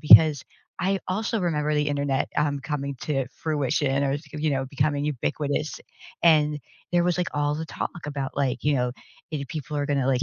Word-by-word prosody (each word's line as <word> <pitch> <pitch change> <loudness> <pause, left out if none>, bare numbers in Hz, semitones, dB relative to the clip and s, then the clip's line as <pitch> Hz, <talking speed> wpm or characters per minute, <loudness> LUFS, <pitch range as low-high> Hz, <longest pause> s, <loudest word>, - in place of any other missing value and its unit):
because 150 -1 +8 0.4
I 195 +1 +1
also 215 +3 0
remember 150 -3 +1
the 150 0 +2
internet, 140 -2 0
um, 145 -1 +1
coming 140 0 -3
to 135 -4 0 0.2
fruition 140 -2 +1
or, 140 0 +1
th 155 - -16 0.2
you 155 - +2
know, 135 -1 0
becoming 145 +2 0
ubiquitous, 145 +1 -1 0.4
and 150 -3 +5 0.3
there 175 0 +4
was, 175 -1 +2
like, 180 - +1
all 145 0 +1
the 160 +1 -4
talk 165 -1 -5
about, 140 -2 -4
like, 135 -3 0
you 145 0 +3
know, 125 -1 +1 0.4
either 145 -3 -3
people 150 0 -5
are 145 -1 0
gonna, 140 -3 +1
like, 130 -2 +2
145 Hz, 190 wpm, -26 LUFS, 140-155 Hz, 0.4 s, because